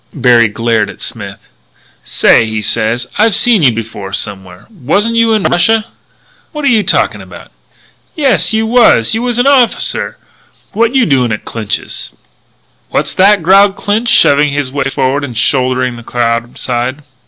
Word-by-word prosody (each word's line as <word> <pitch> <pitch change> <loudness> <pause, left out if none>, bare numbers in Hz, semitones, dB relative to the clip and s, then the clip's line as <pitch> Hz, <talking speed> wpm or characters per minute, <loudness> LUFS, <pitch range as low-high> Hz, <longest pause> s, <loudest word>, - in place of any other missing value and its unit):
Berry 120 -4 +3
glared 110 -1 -1
at 100 - -12
Smith. - - -7 0.6
"Say," 110 - +2
he 110 0 -3
said, 110 +3 0
"I 220 +2 +4
seen 225 -1 +3
you 135 -5 +4
before 110 -4 -7
somewhere. 95 -3 -6
Wasn't 200 - -1
you 230 0 +2
in 215 -3 0
Russia?" 220 +5 +2 0.7
"What 300 -2 -5
are - - +3
you 225 -4 +3
talking - - 0
about?" - - -13 0.6
"Yes, 275 -8 +1
you 220 0 0
was. 225 - +3
You 225 - -1
was 245 -1 -2
an 245 - +1
officer! 270 -4 +1 0.5
What 230 +4 0
you 260 -3 +3
doing 130 - +1
at 105 - -5
Clinch's?" 110 -3 -4 0.8
"What's - - -2
that?" 195 -1 +3
growled 195 +3 +4
Clinch, 215 +5 -2
shoving 145 +1 +4
his 140 -2 -3
way 140 0 -3
forward 135 +1 -1
and 125 -5 -6
shouldering 130 -1 0
the 120 - -11
crowd 115 0 -2
aside. 130 +3 -3
140 Hz, 160 wpm, -11 LUFS, -, 0.8 s, I